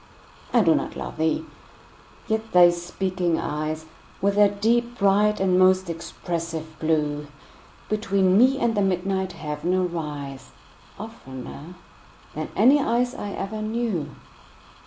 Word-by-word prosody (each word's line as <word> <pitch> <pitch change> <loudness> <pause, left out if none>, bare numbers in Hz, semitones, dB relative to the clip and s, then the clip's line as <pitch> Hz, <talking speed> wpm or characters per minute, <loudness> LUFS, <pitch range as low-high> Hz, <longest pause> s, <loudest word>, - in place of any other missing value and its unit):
I 240 - +5
do 165 -5 +5
not - - -2
love - - -6
thee!—yet 220 +7 -5
thy 175 -1 +8
speaking 175 0 -2
eyes, 155 +1 -3 0.3
With 200 +1 +2
their 205 0 +5
deep, 235 +4 0
bright, 205 +1 +3
and 185 -1 +3
most 185 -1 +4
expressive 165 -1 -5
blue, 150 -2 0 0.6
Between 195 -3 +2
me 255 +5 +5
and 235 -3 +1
the 205 - +2
midnight 190 0 0
heaven 150 +4 -2
arise, 150 -7 -4 0.4
15 210 - -5
Oftener 150 - -10 0.6
than - - -4
any 275 +4 +6
eyes 245 0 +1
I 205 - -5
ever 215 +2 -4
knew. 215 -8 -2
185 Hz, 125 wpm, -24 LUFS, 160-210 Hz, 0.6 s, thy